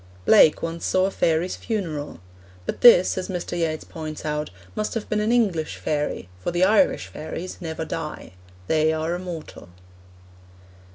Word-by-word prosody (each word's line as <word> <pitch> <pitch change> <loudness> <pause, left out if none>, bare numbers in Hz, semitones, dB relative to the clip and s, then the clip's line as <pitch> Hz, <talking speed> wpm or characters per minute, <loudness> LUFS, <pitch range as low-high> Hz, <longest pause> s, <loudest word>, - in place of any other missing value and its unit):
Blake 150 - +6
once 165 0 -4
saw 185 0 +2
a 195 - -1
fairy's 165 0 +1
funeral. 160 - -4 0.4
But - - -4
this, 190 -6 +7
as 185 - -5
Mr. 180 -1 -4
Yeats 160 -2 -1
points 155 -2 -7
out, 150 0 -2 0.2
must 215 +2 -3
have 225 - -3
been 210 - 0
an 215 +2 +1
English 195 -10 +1
fairy, 150 - -2
for - - -3
the 175 +1 +1
Irish 220 +8 +3
fairies 165 +4 -7
never 160 -1 -4
die; 155 -1 -6 0.3
they 155 +6 +2
are 160 +1 -1
immortal. 175 - -7
165 Hz, 155 wpm, -24 LUFS, 155-185 Hz, 0.4 s, this